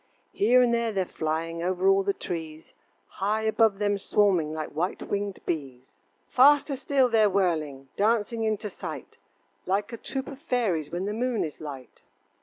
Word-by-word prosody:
Here 250 Hz, +4 st, +4 dB
and 240 Hz, -1 st, +2 dB
there 235 Hz, -1 st, +1 dB
they're 190 Hz, -3 st, 0 dB
flying 165 Hz, +1 st, -3 dB
Over 185 Hz, +2 st, 0 dB
all 195 Hz, 0 st, +5 dB
the 200 Hz, +1 st, +1 dB
trees, 160 Hz, -4 st, -7 dB, 0.3 s
High 210 Hz, +3 st, -2 dB
above 220 Hz, -2 st, +3 dB
them 205 Hz, -1 st, 0 dB
swarming 190 Hz, -7 st, +2 dB
Like 155 Hz, -1 st, -4 dB
white 170 Hz, +5 st, -3 dB
winged 200 Hz, -1 st, -2 dB
bees. 135 Hz, -6 st, -5 dB, 0.3 s
Faster 280 Hz, +2 st, +5 dB
still 270 Hz, -1 st, +2 dB
they're 220 Hz, -3 st, +4 dB
whirling, 155 Hz, -8 st, -1 dB
Dancing 225 Hz, +2 st, +1 dB
into 215 Hz, -1 st, -1 dB
sight, -, -, -8 dB, 0.5 s
Like 205 Hz, +4 st, -1 dB
a -, -, -4 dB
troop 265 Hz, +3 st, -5 dB
of 275 Hz, -2 st, -9 dB
fairies 225 Hz, -, -1 dB
When 175 Hz, +4 st, -3 dB
the 205 Hz, -, -2 dB
moon 240 Hz, 0 st, 0 dB
is 155 Hz, -1 st, -7 dB
light. 135 Hz, -5 st, -9 dB
200 Hz, 165 wpm, -27 LUFS, 165-225 Hz, 0.5 s, all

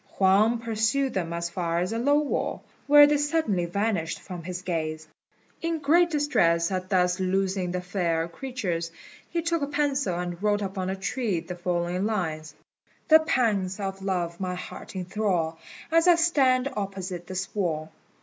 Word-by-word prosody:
Huang 200 Hz, +5 st, +4 dB
pursued 230 Hz, +4 st, 0 dB
them 175 Hz, -4 st, -2 dB
as 170 Hz, 0 st, -3 dB
far 170 Hz, -2 st, -1 dB
as 180 Hz, +5 st, -1 dB
a 230 Hz, -, -1 dB
low 285 Hz, +4 st, +3 dB
wall, 295 Hz, -1 st, -1 dB, 0.2 s
where 290 Hz, 0 st, +9 dB
they 295 Hz, 0 st, +3 dB
suddenly 290 Hz, -, +1 dB
vanished 190 Hz, -2 st, -1 dB
from 180 Hz, -2 st, -8 dB
his 180 Hz, +2 st, -6 dB
gaze. 155 Hz, -3 st, -3 dB, 0.5 s
In 330 Hz, 0 st, -1 dB
great 330 Hz, +4 st, +4 dB
distress 170 Hz, -, +2 dB
at 185 Hz, 0 st, -3 dB
thus 180 Hz, -1 st, +2 dB
losing 190 Hz, 0 st, 0 dB
the 180 Hz, 0 st, -2 dB
fair 175 Hz, -3 st, -1 dB
creatures, 175 Hz, -6 st, -4 dB, 0.4 s
he 335 Hz, -1 st, -2 dB
took 335 Hz, -1 st, 0 dB
a 280 Hz, -, 0 dB
pencil 280 Hz, -10 st, 0 dB
and 175 Hz, 0 st, -4 dB
wrote 205 Hz, 0 st, +1 dB
upon 190 Hz, -1 st, -3 dB
a 190 Hz, -, -1 dB
tree 200 Hz, 0 st, -1 dB
the 180 Hz, -, -7 dB
following 175 Hz, +2 st, -1 dB
lines: 155 Hz, -7 st, -3 dB, 0.5 s
"The 315 Hz, 0 st, +9 dB
pangs 215 Hz, -, 0 dB
of 195 Hz, -1 st, -4 dB
love 175 Hz, -3 st, -2 dB
my 185 Hz, -1 st, -2 dB
heart 180 Hz, -, -9 dB
enthrall 180 Hz, -4 st, -1 dB, 0.3 s
As 330 Hz, +2 st, +4 dB
I 350 Hz, -, +8 dB
stand 275 Hz, -6 st, +3 dB
opposite 190 Hz, -3 st, -4 dB
this 185 Hz, -1 st, -4 dB
wall. 160 Hz, -6 st, -2 dB
190 Hz, 165 wpm, -26 LUFS, 175-255 Hz, 0.5 s, where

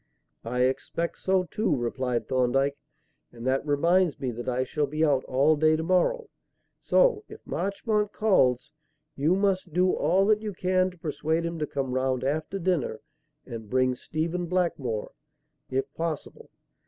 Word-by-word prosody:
"I 125 Hz, +2 st, -2 dB
expect 135 Hz, +6 st, -1 dB
so, 190 Hz, -1 st, +2 dB
too," 195 Hz, -2 st, 0 dB
replied 125 Hz, 0 st, -2 dB
Thorndyke; 135 Hz, +2 st, +1 dB, 0.6 s
"and 120 Hz, 0 st, -10 dB
that 130 Hz, +1 st, +1 dB
reminds 165 Hz, +3 st, +2 dB
me 130 Hz, -3 st, -2 dB
that 120 Hz, +2 st, -5 dB
I 125 Hz, +1 st, 0 dB
shall 145 Hz, +3 st, -1 dB
be 155 Hz, +3 st, +1 dB
out 140 Hz, -4 st, +2 dB
all 140 Hz, +5 st, +3 dB
day 155 Hz, +1 st, +3 dB
to 160 Hz, -, -2 dB
morrow, 185 Hz, -, +1 dB, 0.5 s
so, 480 Hz, -4 st, +3 dB
if -, -, -10 dB
Marchmont 210 Hz, +1 st, -1 dB
calls, 130 Hz, -, +2 dB, 0.4 s
you 155 Hz, +6 st, +2 dB
must 190 Hz, -4 st, 0 dB
do 180 Hz, +2 st, +3 dB
all 180 Hz, +6 st, +2 dB
that 215 Hz, 0 st, +3 dB
you 210 Hz, -2 st, -4 dB
can 185 Hz, +1 st, +1 dB
to 180 Hz, -, -16 dB
persuade 160 Hz, +1 st, -1 dB
him 170 Hz, -1 st, -4 dB
to 150 Hz, -, -1 dB
come 135 Hz, -2 st, -3 dB
round 130 Hz, 0 st, 0 dB
after 155 Hz, +7 st, -1 dB
dinner 170 Hz, -, -1 dB, 0.4 s
and 110 Hz, -3 st, -8 dB
bring 130 Hz, +1 st, +2 dB
Stephen 165 Hz, +6 st, -3 dB
Blackmore, 150 Hz, -11 st, -1 dB, 0.6 s
if 135 Hz, +2 st, -2 dB
possible. 165 Hz, -2 st, -5 dB
155 Hz, 155 wpm, -27 LUFS, 130-185 Hz, 0.6 s, all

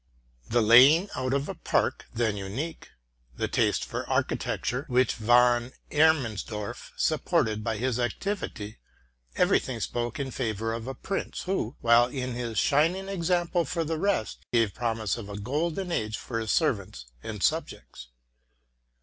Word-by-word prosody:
The 120 Hz, 0 st, +3 dB
laying 135 Hz, -, +7 dB
out 130 Hz, 0 st, -2 dB
of 140 Hz, +1 st, 0 dB
a -, -, -4 dB
park, -, -, -1 dB
then 110 Hz, -3 st, 0 dB
unique, 105 Hz, +12 st, -5 dB, 0.5 s
the -, -, 0 dB
taste -, -, +1 dB
for -, -, -5 dB
architecture, 125 Hz, +2 st, -1 dB
w 125 Hz, -3 st, -2 dB
hich 130 Hz, 0 st, +4 dB
Von 120 Hz, +2 st, +3 dB, 0.2 s
E -, -, -9 dB
rdmannsdor 120 Hz, -8 st, +1 dB
i -, -, -14 dB
supported 145 Hz, -9 st, +1 dB
by 110 Hz, -1 st, -1 dB
his 125 Hz, +1 st, -1 dB
activity, 120 Hz, -, -3 dB, 0.6 s
every -, -, +4 dB
thing -, -, -5 dB
spoke 120 Hz, +1 st, -3 dB
in 135 Hz, -2 st, -3 dB
favor 115 Hz, -3 st, -2 dB
of 115 Hz, +2 st, -5 dB
prince, 195 Hz, -, -3 dB
who, 180 Hz, -, -2 dB
while 115 Hz, +1 st, +5 dB
he 130 Hz, 0 st, -4 dB
was 130 Hz, -1 st, -4 dB
a 120 Hz, -2 st, -4 dB
shining 165 Hz, -, +2 dB
example 175 Hz, -1 st, +1 dB
for 165 Hz, +3 st, -2 dB
the 160 Hz, +1 st, -3 dB
ate 200 Hz, -, 0 dB
gave 115 Hz, -5 st, +2 dB
promise 115 Hz, -4 st, -1 dB
of 105 Hz, -3 st, -8 dB
a 100 Hz, -, -6 dB
golden 160 Hz, -, -2 dB
age 110 Hz, -7 st, -1 dB
for 115 Hz, -3 st, -4 dB
his 110 Hz, -1 st, -2 dB
servants 100 Hz, -, 0 dB, 0.2 s
and 105 Hz, -, -5 dB
subjects. -, -, -2 dB
120 Hz, 160 wpm, -27 LUFS, 110-155 Hz, 0.6 s, laying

